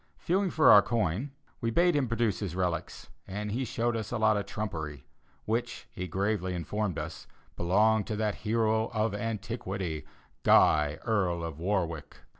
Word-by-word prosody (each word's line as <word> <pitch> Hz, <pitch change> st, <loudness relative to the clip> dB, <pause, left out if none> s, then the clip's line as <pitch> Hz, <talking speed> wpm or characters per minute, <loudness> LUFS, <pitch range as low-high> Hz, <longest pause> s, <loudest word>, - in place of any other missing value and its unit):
Feeling 190 Hz, +2 st, +1 dB
for 155 Hz, -1 st, +5 dB
our 100 Hz, -, +10 dB
coin, 110 Hz, -, -1 dB, 0.3 s
we 115 Hz, -, -1 dB
bade 170 Hz, +7 st, +3 dB
him 140 Hz, -3 st, +1 dB
produce 115 Hz, -4 st, 0 dB
his 95 Hz, -5 st, -4 dB
relics, 90 Hz, -2 st, -3 dB, 0.2 s
and 105 Hz, +2 st, -4 dB
he 125 Hz, +5 st, -1 dB
showed 120 Hz, -1 st, -1 dB
us 110 Hz, -2 st, -3 dB
a 120 Hz, -, -1 dB
lot 110 Hz, -1 st, +3 dB
of 100 Hz, -1 st, -2 dB
trumpery, 80 Hz, -11 st, -5 dB, 0.4 s
which, 120 Hz, +2 st, -2 dB
he 90 Hz, 0 st, -5 dB
gravely 95 Hz, 0 st, -1 dB
informed 95 Hz, +2 st, -2 dB
us, -, -, -6 dB, 0.3 s
belonged 105 Hz, +4 st, +2 dB
to 110 Hz, -, -2 dB
that 105 Hz, -1 st, 0 dB
hero 110 Hz, 0 st, +1 dB
of 110 Hz, -1 st, +1 dB
antiquity, 100 Hz, -7 st, -4 dB, 0.3 s
Guy, 75 Hz, 0 st, +4 dB
Earl 95 Hz, -7 st, +1 dB
of 80 Hz, -2 st, -5 dB
Warwick. 85 Hz, -4 st, -2 dB
105 Hz, 160 wpm, -29 LUFS, 90-115 Hz, 0.4 s, our